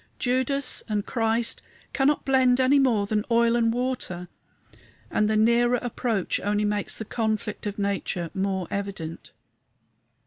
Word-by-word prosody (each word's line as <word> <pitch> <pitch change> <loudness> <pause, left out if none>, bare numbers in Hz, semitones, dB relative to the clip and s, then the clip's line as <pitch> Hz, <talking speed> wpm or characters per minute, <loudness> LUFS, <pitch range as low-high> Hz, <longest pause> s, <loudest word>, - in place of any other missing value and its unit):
Judas 260 +2 0
and 210 -1 -1
Christ 230 0 0 0.3
cannot 285 +1 +2
blend 260 -2 +4
any 265 +2 +5
more 235 -7 +3
than 210 0 0
oil 235 0 +3
and 230 -1 +3
water, 235 -8 -3 0.8
and 210 0 +2
the 220 - +2
nearer 235 +3 +4
approach 230 -5 -1
only 210 +1 0
makes 205 -1 -1
the 220 - -5
conflict 215 -1 -2
of 205 - -4
nature 195 -4 -2
more 190 -2 -1
evident. 195 -5 -5
220 Hz, 135 wpm, -25 LUFS, 200-245 Hz, 0.8 s, any